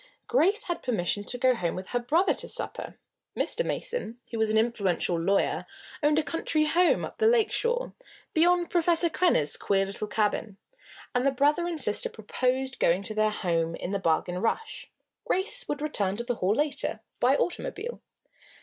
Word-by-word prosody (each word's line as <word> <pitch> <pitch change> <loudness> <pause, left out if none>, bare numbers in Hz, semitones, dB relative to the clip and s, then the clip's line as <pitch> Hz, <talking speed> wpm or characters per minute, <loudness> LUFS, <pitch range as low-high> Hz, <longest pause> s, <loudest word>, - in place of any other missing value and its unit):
Grace 425 0 +4
had 345 -2 -3
permission 205 -4 -1
to 245 - -4
go 255 +1 +4
home 175 -8 -2
with 185 +1 -7
her 245 - 0
brother 315 +11 +2
to - - -6
supper. - - -5 0.4
Mr. - - +2
Mason, 245 - -3
who 230 - -3
was 220 -1 +2
an 215 - +2
influential 205 -6 +1
lawyer, 190 +4 0 0.3
owned 295 0 +3
a 315 - +3
country 310 -1 0
home 345 +3 +3
up - - -11
the 440 - +4
lake 455 -2 +3
shore, 485 +1 -1 0.4
beyond 350 +1 +3
Professor 340 -1 +2
Krenner's 155 - +2
queer 195 -1 +1
little 200 +2 -5
cabin, 210 -1 -1 0.6
and 250 -1 +1
the 275 - +4
brother 290 +6 +2
and 335 -3 -2
sister 210 -6 +1
proposed 255 +4 -2
going 180 +4 +2
to 215 - -3
their 215 0 +2
home 165 -5 -1
in 175 - -5
the 200 - -1
Bargain 180 +1 0
Rush. 340 - -2 0.4
Grace 380 +4 +1
would 295 0 -3
return 205 -10 -1
to 235 - -3
the 245 +1 -1
Hall 190 +3 +1
later, 285 -6 -1 0.2
by 255 +3 +4
automobile. 465 +7 -3
250 Hz, 175 wpm, -27 LUFS, 205-340 Hz, 0.6 s, Grace